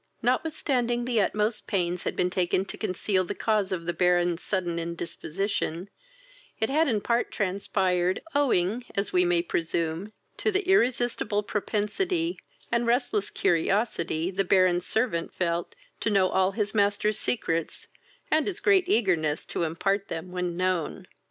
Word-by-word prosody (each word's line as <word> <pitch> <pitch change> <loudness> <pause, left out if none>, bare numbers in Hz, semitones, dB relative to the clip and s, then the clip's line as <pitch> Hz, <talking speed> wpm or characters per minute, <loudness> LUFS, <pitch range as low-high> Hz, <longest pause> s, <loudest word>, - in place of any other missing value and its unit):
Notwithstanding 245 -2 0
the 240 -3 +2
utmost 210 +3 0
pains 180 -3 0
had - - -2
been 180 0 +1
taken 185 +1 +1
to - - -6
conceal 190 -1 0
the 175 - -5
cause 215 -3 0
of 170 -3 -3
the 175 - -1
Baron's 175 -1 +2
sudden 175 -4 -1
indisposition, 170 +2 -3 0.7
it 220 - 0
had 315 +3 +3
in 220 -6 +1
part 235 +2 +1
transpired, 185 -2 0
owing, 240 -6 +2
as 200 0 -1
we 180 0 +4
may 175 -1 +2
presume, 170 +3 -2 0.3
to 430 - +1
the 395 -1 0
irresistible 240 - +2
propensity, 275 - -1 0.3
and 235 0 +1
restless 235 -4 +1
curiosity, 170 -2 0
the 195 +1 0
Baron's 180 -1 +3
servant 220 -8 -1
felt 170 -1 -1 0.2
to - - 0
know 195 -3 +3
all 190 +1 +2
his 205 -1 -1
master's 205 0 +2
secrets, 165 -8 -1 0.5
and 310 -1 +3
his 395 - -3
great 395 -4 +4
eagerness 170 - +2
to - - -4
impart 195 +5 0
them 170 +2 -5
when 180 -1 -3
known. 185 -3 -1
195 Hz, 145 wpm, -27 LUFS, 175-235 Hz, 0.7 s, we